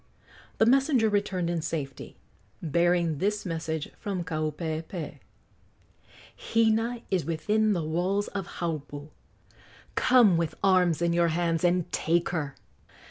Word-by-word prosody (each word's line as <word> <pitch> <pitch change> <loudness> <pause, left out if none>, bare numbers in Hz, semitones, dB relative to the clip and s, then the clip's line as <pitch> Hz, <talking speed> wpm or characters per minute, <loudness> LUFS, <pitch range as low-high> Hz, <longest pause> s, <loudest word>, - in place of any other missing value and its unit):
The 220 - +4
messenger 265 -2 +3
returned 200 -4 0
in 170 -1 -1
safety, 150 -4 -5 0.4
bearing 170 -1 +1
this 205 +3 -1
message 160 -3 -3
from 195 -5 -3
Kaupeepee: 160 0 -4 1.2
"Hina 230 +1 +1
is 185 -3 +1
within 210 +8 +1
the 170 -4 -1
walls 180 +6 0
of 195 -3 -5
Haupu. 150 -3 -4 0.8
Come 235 -9 +5
with 165 -1 -1
arms 180 -4 +3
in 170 0 +2
your 170 0 +3
hands 165 0 0
and 175 -1 +1
take 170 +1 +1
her!" 150 -6 -3
175 Hz, 120 wpm, -27 LUFS, 160-200 Hz, 1.2 s, Come